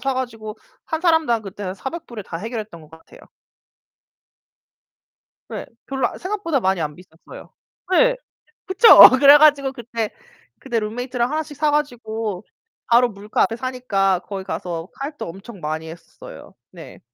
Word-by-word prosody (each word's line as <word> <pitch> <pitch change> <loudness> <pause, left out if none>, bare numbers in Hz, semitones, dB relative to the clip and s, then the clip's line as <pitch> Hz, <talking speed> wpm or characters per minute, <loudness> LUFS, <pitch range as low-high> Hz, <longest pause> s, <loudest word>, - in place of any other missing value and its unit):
사 270 +1 -1
가지고 225 -4 -5 0.3
한 320 - -3
사람당 320 -10 +2
그때 200 +1 -9
한 185 -1 -4
$400 265 - -8
에 - - -7
다 165 -3 -7
해결 225 +5 -5
했던 205 -6 -10
것 155 0 -17
같아요. 160 0 -17 2.3
네. - - -6 0.2
별로 265 -3 -1
아 - - -10
생각보다 370 -7 -2
많이 190 -4 0
안 150 -1 -3
비쌌어요. 170 -1 -15 0.4
네. - - +4 0.5
그쵸? 380 +5 +3 0.3
그래 285 +1 +9
가지고 285 -3 +4
그때, 230 -3 -5 0.5
그때 240 -4 -2
룸메이트랑 245 +4 -3
하나씩 305 -2 -4
사가지고 235 -10 -2 0.4
바로 240 +1 +4
물가 205 0 -3
앞에 225 - -1
사니까 225 -7 -1
거기 195 +1 -7
가서 175 -2 -5
카약도 285 - -6
엄청 195 +4 -11
많이 160 +1 -5
했었어요. 165 +1 -13 0.2
네. - - -13
235 Hz, 300 characters per minute, -21 LUFS, 195-280 Hz, 2.3 s, 그래